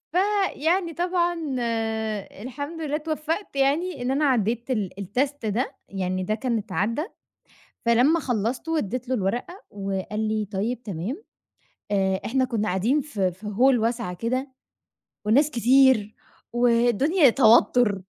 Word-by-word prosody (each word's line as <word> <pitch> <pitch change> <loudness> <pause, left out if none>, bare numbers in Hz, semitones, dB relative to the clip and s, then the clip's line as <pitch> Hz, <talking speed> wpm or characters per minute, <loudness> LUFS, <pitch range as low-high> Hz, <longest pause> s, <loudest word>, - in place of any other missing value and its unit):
فيعني 375 -3 +1
طبعًا، 350 0 0 1.1
الحمد 285 +7 -6
لله 295 -1 -2
اتوفقت 315 +3 -3
يعني 285 +3 +1
إن 250 +1 -1
أنا 290 +3 +1
عديت 240 -1 0
ال 210 -7 0
الtest 260 +6 -2
ده، 235 +6 -2
يعني 185 -1 -2
ده 215 +4 -1
كان 235 0 -1
اتعدى، 215 +4 -1 0.9
فلما 250 +8 +4
خلصته 245 +4 -2
واديت 250 -4 -2
له 260 - +1
الورقة 245 - -3
وقال 195 +1 -4
لي: 215 0 0
"طيب، 225 +5 -2
تمام." 210 - -5 0.7
آآ، 190 -1 +1
إحنا 260 +3 +1
كُنا 225 -4 -1
قاعدين 220 +11 +1
ف 280 -7 -7
في 190 +2 -1
Hall 245 +4 +3
واسعة 230 -5 -1
كده 255 +7 -2 0.7
والناس 280 +8 +3
كتير 245 -3 +4 0.4
والدنيا 245 - +4
توتر. 230 -4 +4
245 Hz, 125 wpm, -24 LUFS, 210-290 Hz, 1.1 s, فلما